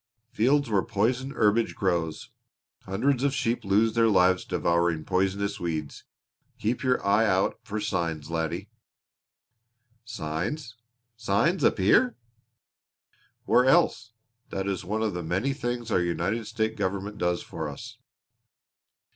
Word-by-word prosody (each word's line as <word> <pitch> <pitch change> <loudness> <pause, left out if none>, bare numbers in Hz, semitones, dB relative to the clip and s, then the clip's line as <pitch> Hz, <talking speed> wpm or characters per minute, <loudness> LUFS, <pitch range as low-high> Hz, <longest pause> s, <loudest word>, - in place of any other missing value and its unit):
"Fields 140 +5 +2
where 105 -4 +2
poison 120 +5 0
herbage 110 -3 +1
grows. 85 -5 -2 0.5
Hundreds 125 +7 0
of 140 -1 +1
sheep 120 -4 -1
lose 105 +3 +2
their 115 0 +4
lives 95 -3 +4
devouring 85 -2 0
poisonous 100 +2 0
weeds. 80 -4 -4 0.5
Keep 115 +3 -1
your 130 -1 +1
eye 105 +3 +4
out 95 -1 +1
for 105 +2 -4
signs, 85 -7 -2
laddie." 85 +5 -3 1.3
"Signs! 110 - -4 0.4
Signs 115 - +1
up - - +3
here!" 225 - +4 1.3
"Where 125 - +4
else? 125 -3 +3 0.4
That 95 0 -3
is 95 -2 -2
one 105 +5 -2
of 110 -3 -1
the 90 - -3
many 95 +12 -1
things 120 -4 -4
our 90 - +3
United 100 +6 -1
States 110 0 -2
government 100 +1 -3
does 90 0 0
for 80 -2 -5
us. 70 - -10
100 Hz, 130 wpm, -27 LUFS, 90-115 Hz, 1.3 s, their